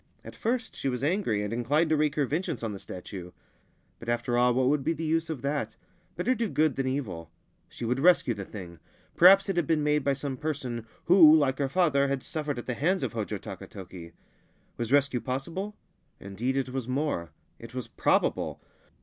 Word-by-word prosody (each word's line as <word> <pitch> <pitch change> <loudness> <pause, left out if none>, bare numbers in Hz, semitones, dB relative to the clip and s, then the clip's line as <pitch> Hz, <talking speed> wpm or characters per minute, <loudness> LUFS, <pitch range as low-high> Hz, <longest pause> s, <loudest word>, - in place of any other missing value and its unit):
At - - -9
first 235 0 -2
she 135 - -2
was 125 0 -3
angry 145 - +1
and 105 +2 -3
inclinec 145 +8 +1
to 155 - +3
wreak 150 -1 +1
her 145 - +2
vengeance 150 -4 -2
on 115 - -2
the 100 - -7
statue; 90 -1 -8 0.7
but, 115 - -7
after 120 +1 0
all 125 +1 +4
what 130 +1 +2
would 145 0 +2
be 160 +4 +1
the 165 0 -5
use 165 +1 0
of 150 -6 -5
that? 145 +1 -2 0.4
Better 255 - +1
do 230 -3 -2
good 155 -4 +2
thai 135 -1 -1
evil. 105 - -3 0.4
She 120 - -7
would 125 +3 0
rescue 165 -6 +4
the 100 -2 -6
thing. 90 -4 -9 0.4
Perhaps 195 +3 +7
it 195 -3 -1
had 170 -5 +1
beer 160 - +3
made 150 -1 +1
by 140 - +2
some 135 -1 -4
person 125 -6 -4 0.2
who, 170 -3 +8
like 135 -3 +1
her 140 -1 0
father, 140 -4 +3
had 135 -1 -1
sufFerec 150 -4 -3
at 120 - -6
the 125 - -2
hands 180 +10 0
of - - -2
Hojo 110 -2 -3
Takatoki. 95 -3 -9 0.6
Was 120 0 -4
rescue 140 -3 +3
possible 165 - -4 0.4
Indeed 115 +7 -3
it 135 -1 -1
was 130 -2 -4
more: 130 - -1 0.3
it - - -11
was - - -4
probable. - - 0
135 Hz, 200 wpm, -28 LUFS, 120-155 Hz, 0.7 s, who